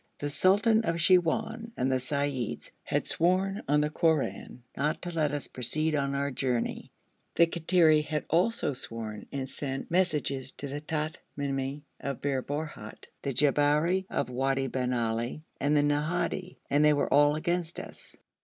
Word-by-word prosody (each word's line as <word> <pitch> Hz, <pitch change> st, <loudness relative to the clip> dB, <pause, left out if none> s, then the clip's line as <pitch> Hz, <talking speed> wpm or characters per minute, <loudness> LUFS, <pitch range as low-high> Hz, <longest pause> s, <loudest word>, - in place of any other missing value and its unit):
The 145 Hz, 0 st, -3 dB
sultan 205 Hz, +8 st, +4 dB
of 165 Hz, -5 st, 0 dB
Siwoun 185 Hz, +7 st, +2 dB
and 130 Hz, +1 st, +1 dB
the 130 Hz, -, +2 dB
seyyids 140 Hz, -2 st, -2 dB
had -, -, -1 dB
sworn 190 Hz, +4 st, +1 dB
on 150 Hz, +2 st, +3 dB
the 150 Hz, 0 st, 0 dB
Koran 155 Hz, -6 st, 0 dB
not 150 Hz, +3 st, 0 dB
to 175 Hz, -, -4 dB
let 155 Hz, -4 st, 0 dB
us 145 Hz, -1 st, -3 dB
proceed 155 Hz, +6 st, 0 dB
on 140 Hz, -1 st, 0 dB
our 140 Hz, 0 st, -1 dB
journey; 125 Hz, -2 st, -2 dB, 0.4 s
the 170 Hz, -, +6 dB
Kattiri 165 Hz, -2 st, +3 dB
had 150 Hz, 0 st, -3 dB
also 175 Hz, -1 st, +1 dB
sworn 115 Hz, -4 st, -6 dB
and 135 Hz, -1 st, -3 dB
sent 135 Hz, +1 st, -5 dB
messages 150 Hz, -7 st, 0 dB
to 140 Hz, -, -6 dB
the 145 Hz, +2 st, -5 dB
Tamimi 145 Hz, -3 st, -3 dB, 0.2 s
of 140 Hz, -2 st, -4 dB
Bir 135 Hz, -2 st, -1 dB
Borhut, 145 Hz, -6 st, -6 dB
the 140 Hz, -, -2 dB
Jabberi 150 Hz, +7 st, +2 dB
of -, -, -2 dB
Wadi 135 Hz, +1 st, 0 dB
bin 125 Hz, -1 st, -1 dB
Ali, 120 Hz, +4 st, -1 dB, 0.2 s
and 145 Hz, +2 st, +2 dB
the 145 Hz, -, +4 dB
Nahadi, 160 Hz, +5 st, -1 dB
and 145 Hz, +1 st, +3 dB
they 150 Hz, 0 st, +6 dB
were 145 Hz, -, 0 dB
all 145 Hz, +1 st, +5 dB
against 170 Hz, +1 st, -1 dB
us. -, -, -10 dB
145 Hz, 160 wpm, -29 LUFS, 135-165 Hz, 0.4 s, the